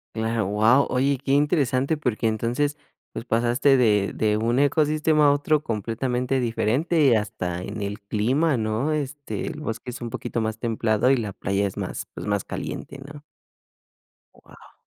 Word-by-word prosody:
Cla 110 0 0
guau, 110 +7 +3
oye, 135 +2 +2
qué 135 +1 -4
interesante 140 -1 +2
porque 120 -6 -1
entonces 120 +7 -1 0.4
pues - - -6
pasaste 120 +4 +3
de 105 -5 +3
de 105 -1 +1
un 120 +4 +1
ecosistema 150 +1 +3
a - - +6
otro 145 +1 +1
completamente 125 +4 -1
diferente 125 +8 +1
y 125 -5 +5
hasta 90 -4 -3
en 100 +2 -6
el 100 +2 -4
clima 125 +10 +1
¿no? 110 +6 -1
Este, 145 -7 -4
el 150 - -5
bosque 115 -3 -5
es 120 0 -7
un 120 -1 -5
poquito 115 - -4
más 110 0 -2
templado 115 0 +1
y 135 - +4
la 105 -4 -3
playa 100 +1 -1
es 95 - -5
más, - - -4
pues, - - -7
más 100 -2 0
caliente 140 - -6
¿no? 145 +1 -11 1.1
Guau. - - -18
120 Hz, 165 wpm, -24 LUFS, 110-140 Hz, 1.1 s, a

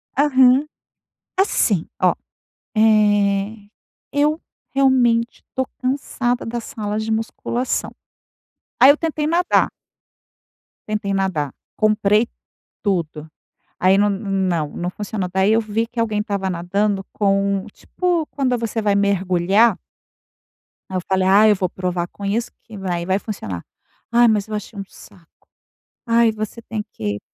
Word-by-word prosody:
Aham. 265 -1 +5 0.7
Assim, 215 - +2
ó, - - +4 0.6
eh, 205 -1 +2 0.4
eu 300 +3 +1 0.3
realmente 245 -4 +2
estou 260 0 -3
cansada 255 -2 -1
das 235 0 -4
salas 215 -4 -3
de 220 - -3
musculação. 230 +3 -2 0.9
Aí 265 +3 +9
eu 285 - +5
tentei 310 -1 -2
nadar 345 +3 +2 1.2
tentei 210 -2 -2
nadar, 180 -8 -1 0.2
comprei 215 0 +3 0.6
tudo. 160 -6 -2 0.5
Aí, 190 +1 +5
n 205 - +4
não 190 -6 -1
não 175 +1 -4
funcionou. 205 -2 -3
Daí 190 +2 +3
eu 225 - +4
vi 225 +1 -1
que 240 - -10
alguém 220 -2 0
estava 200 -3 -2
nadando 195 +3 -1
com 195 -1 +1
tipo 350 -3 -1
quando 260 -3 0
você 230 -1 -2
vai 205 -2 +2
mergulhar 200 +2 +3 1.2
aí 190 - -5
eu - - -2
falei: 190 -1 +1
"Ah, 205 +3 +6
eu 210 - +5
vou 185 -2 -1
provar 180 -1 -2
com 200 - -13
isso 225 +4 -1
que 220 -3 -11
vai 175 -3 -3
vai 190 +2 +1
funcionar". 105 - -6 0.5
Ah, 240 0 +5
mas 215 -2 +1
eu 215 - -4
achei 210 0 -6
um - - -3
saco. 170 -3 -19 0.6
Ai, 230 -1 +4
você 215 +2 -6
tem 220 -2 -5
que 105 -1 -3
210 Hz, 135 wpm, -20 LUFS, 195-235 Hz, 1.2 s, Aí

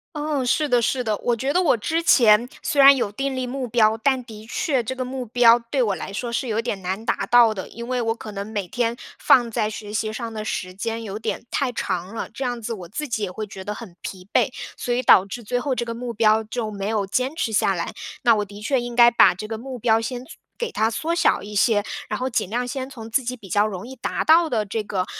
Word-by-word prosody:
哦， 295 -2 -1
是 295 +5 +1
的 245 -2 +3
是 250 +2 0
的。 215 -2 0
我 240 -1 0
觉 265 +5 -1
得 360 - +3
我 320 - +3
之 320 +10 -1
前 235 -7 +5
虽 290 - +1
然 275 0 +9
有 215 -6 -1
订 270 +4 -2
立 255 -1 -2
目 255 0 -4
标， 220 -1 +3
但 265 -2 +2
的 220 -2 -11
确 275 -8 0
这 260 +3 -5
个 255 - -2
目 255 0 -5
标 235 0 +6
对 270 -3 +2
我 210 -4 +1
来 190 - -6
说 235 +4 -4
是 255 +2 -2
有 220 0 0
点 215 -4 -3
难 190 +4 -4
达 - - -1
到 235 -2 +6
的。 195 -3 -6
因 235 +1 -8
为 255 -1 0
我 225 -1 0
可 220 -2 -9
能 200 0 -5
每 210 -3 -3
天 235 +5 -1 0.2
放 240 -2 +4
在 220 -1 0
学 210 -1 -7
习 215 0 -1
上 230 0 -5
的 215 -1 -5
时 185 -4 -3
间 225 +4 -3
有 205 -1 -5
点 220 - -4
太 275 -3 0
长 190 -4 -3
了， - - -4
这 265 - -7
样 245 -1 -2
子 230 +1 -4
我 185 -6 -7
自 300 - -4
己 230 -5 -3
也 200 - -2
会 215 +4 -5
觉 195 -1 -9
得 210 +2 -4
很 210 -5 -10
疲 185 -1 -8
惫， - - +3 0.3
所 245 - -3
以 245 +1 +1
导 195 -5 +6
致 235 +5 -7
最 245 +3 -1
后 270 0 -1
这 240 - -2
个 230 0 -5
目 240 0 -5
标 220 0 +3
就 220 0 -4
没 200 -1 -4
有 215 -2 0
坚 255 +9 -1
持 240 -9 -1
下 200 -2 +2
来。 170 -2 -3 0.3
那 235 - +5
我 210 - 0
的 205 +1 -12
确 260 +3 +1
应 240 0 -6
该 240 -1 +8
把 225 -6 +6
这 215 +4 -7
个 220 0 -5
目 255 +2 -7
标 225 0 +3
先 245 +2 -5
做 - - -12 0.2
给 475 -2 -3
它 220 +1 +1
缩 320 +9 -2
小 340 - +3
一 210 +1 -9
些， 205 0 +3 0.2
然 - - -2
后 255 - -1
尽 230 -6 -1
量 245 +3 -1
先 260 +1 -5
从 225 -5 -9
自 230 +4 +1
己 250 +1 -4
比 210 -5 -13
较 205 +4 +3
容 200 -1 -4
易 260 - -9
达 245 - -3
到 325 +1 +5
的 220 -3 0
这 215 +3 -2
个， 190 -3 -2
230 Hz, 290 characters per minute, -23 LUFS, 210-250 Hz, 0.3 s, 然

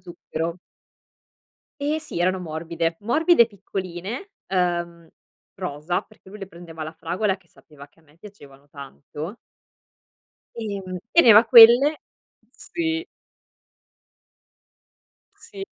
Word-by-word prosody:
zucchero. 170 0 -6 1.2
Ehm, 300 +2 -1
sì, 305 - -7
erano 185 +2 +1
morbide, 165 0 -3
morbide 290 +3 +4
piccoline, 195 - -7 0.2
ehm, 175 -2 -2 0.5
rosa, 175 -1 -3
perché - - -21
lui 210 - -11
le 195 - -7
prendeva 170 -3 -13
alla 155 0 -5
fragola 185 +5 -2
che 180 -3 -30
sapeva 145 -3 -16
che 165 - -29
a - - -29
me 150 0 -26
piacevano 145 -8 -16
tanto. 145 - -9 1.2
Ehm, 195 -4 -5
teneva 235 -9 +7
quelle 245 +6 +7 0.5
sì. 330 0 -4 2.3
Sì, 405 -4 -10
185 Hz, 105 wpm, -23 LUFS, 165-230 Hz, 2.3 s, teneva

